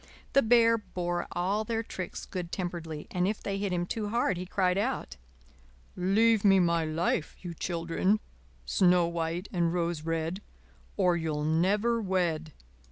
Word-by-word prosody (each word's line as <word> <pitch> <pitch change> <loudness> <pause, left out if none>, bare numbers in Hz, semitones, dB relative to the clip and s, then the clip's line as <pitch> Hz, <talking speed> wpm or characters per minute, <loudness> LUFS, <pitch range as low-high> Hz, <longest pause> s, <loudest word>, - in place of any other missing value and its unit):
The 275 - +6
Bear 230 -1 +5
bore 175 -4 -3
all 195 +5 0
their 225 +1 -2
tricks 185 -4 -6
good 180 -2 -5
temperedly, 170 -4 -4
and 180 0 +1
if 210 +1 -1
they 195 0 -2
hit 200 -1 -1
him 175 -1 0
too 210 +3 -3
hard 225 -3 +1
he 180 +1 -5
cried 180 -1 +1
out: 240 - -2 0.8
"Leave 210 +4 +3
me 195 -2 +6
my 170 -2 +2
life, 160 0 -1
you 175 -2 -5
children, 170 +5 0 0.5
Snow 180 - +4
White 170 +2 -2
and 170 -2 +1
Rose 170 -2 -1
Red, 165 +3 -2 0.6
Or 180 -3 +3
you'll 155 -3 -2
never 200 +9 +2
wed." 175 -5 -1
180 Hz, 155 wpm, -29 LUFS, 170-205 Hz, 0.8 s, The